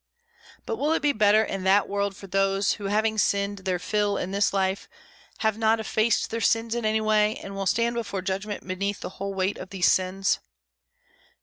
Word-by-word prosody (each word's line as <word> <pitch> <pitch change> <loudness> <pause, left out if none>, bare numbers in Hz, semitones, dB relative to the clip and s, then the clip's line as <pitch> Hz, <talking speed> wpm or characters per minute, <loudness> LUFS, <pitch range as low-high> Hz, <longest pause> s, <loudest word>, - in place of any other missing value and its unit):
But 225 - -3
will 295 +6 +1
it 325 - -1
be 295 - +4
better 215 0 +4
in 195 -3 -4
that 195 +1 +4
world 200 0 -2
for 195 - -11
those 195 +1 +1
who 205 - -7
having 215 +2 +1
sinned 200 0 +1
their 185 -1 -1
fill 205 +2 0
in 180 - -3
this 200 0 +2
life, 190 0 -1 0.5
have 220 -1 +1
not 225 0 +3
effaced 220 +1 +1
their 230 +1 -2
sins 225 +2 +1
in 240 -1 -2
any 220 0 +1
way, 215 0 +2
and 195 - -8
will 195 -1 -2
stand 230 +3 +1
before 200 -5 -4
judgment 195 +1 -4
beneath 200 +2 -3
the - - -5
whole 195 0 -3
weight 190 +1 -1
of 185 - -8
these 190 -3 +3
sins? 185 +1 +1
200 Hz, 200 wpm, -25 LUFS, 195-220 Hz, 0.5 s, be